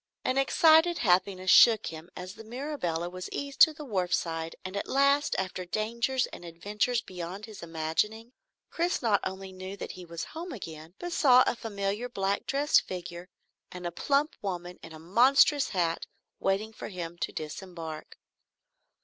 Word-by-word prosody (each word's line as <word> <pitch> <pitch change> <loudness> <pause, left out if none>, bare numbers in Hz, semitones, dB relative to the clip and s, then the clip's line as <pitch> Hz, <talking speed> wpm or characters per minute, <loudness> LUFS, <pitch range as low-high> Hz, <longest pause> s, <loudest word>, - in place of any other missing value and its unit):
An 260 +1 +2
excited 320 +5 +5
happiness 185 -1 +2
shook 225 -3 +7
him 160 +2 -7
as 180 +1 -7
the 225 - -11
Mirabelle 225 - -3
was 185 0 -6
eased 280 -1 -5
to 315 - +10
the 305 -1 -9
wharfside, 175 -6 -1
and 185 +1 -5
at 200 - -3
last, 280 +2 +3
after 185 -1 -3
dangers 235 +7 0
and - - -9
adventures 210 +8 -1
beyond 185 +3 -7
his 215 -2 -11
imagining, 170 +9 -2 0.4
Chris 345 -3 -1
not 215 -3 +3
only 190 0 -5
knew 185 +1 -8
that - - -6
he 185 - -10
was 170 -1 -6
home 340 +3 -7
again, 165 -5 -9
but 350 -1 -5
saw 255 -5 +6
a - - +1
familiar 205 +1 -3
black 195 -3 -1
dressed 285 +3 +3
figure 180 -1 -7 0.4
and 180 -1 -8
a 175 - -2
plump 280 - +1
woman 180 -2 -5
in 165 - -11
a 160 - -9
monstrous 255 - +4
hat, 170 -3 -1 0.3
waiting 205 +3 0
for - - -7
him 175 -3 -6
to - - -2
disembark. 160 0 -7
195 Hz, 165 wpm, -29 LUFS, 175-250 Hz, 0.4 s, to